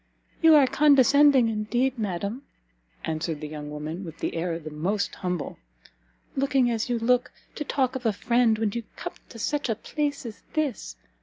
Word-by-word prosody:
"You 325 -2 +8
are 290 -3 +7
condescending, 280 -2 +5
indeed, 240 +4 0
madam," 200 +4 -3 0.6
answered 160 -1 -2
the 150 - -5
young 150 -1 -7
woman, 155 +5 -5
with 165 -3 -10
an - - -1
air 165 0 -2
the 155 -2 -8
most 190 +7 -1
humble, 180 -4 -4 0.8
"looking 270 -2 +2
as 225 +1 -1
you 240 - +1
look, 250 +2 +2 0.2
to 300 - -4
talk 265 -2 0
of 250 -3 -1
a - - +4
friend 230 +2 +2
when 215 -2 0
you 235 - -3
come - - -6 0.2
to 235 - -11
such 285 +4 -1
a 225 - +1
place 285 +4 -3
as 225 -3 -8
this! 275 - -2
230 Hz, 175 wpm, -26 LUFS, 180-265 Hz, 0.8 s, You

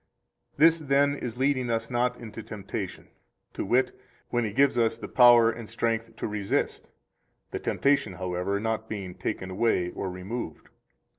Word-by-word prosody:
106 165 +3 +5
This, 155 - -11
then, 140 +1 +4
is 120 -4 -5
leading 130 -2 +1
us 115 0 -1
not 125 +1 +1
into 115 -1 -8
temptation, 105 -3 -6 0.5
to - - -3
wit, 125 +6 +2 0.3
when 120 0 +1
He 110 - -2
gives 140 +4 +3
us 115 -1 +2
power 120 -1 +6
and 115 -1 -8
strength 115 0 -2
to - - -3
resist, 105 -2 -2 0.6
the - - -3
temptation, 140 -8 +1
however, 90 +2 -2
not 110 +1 -2
being 95 -4 -5
taken 95 +1 -4
away 95 -3 +1
or 95 - -4
removed. 90 0 -6
115 Hz, 155 wpm, -27 LUFS, 100-125 Hz, 0.6 s, power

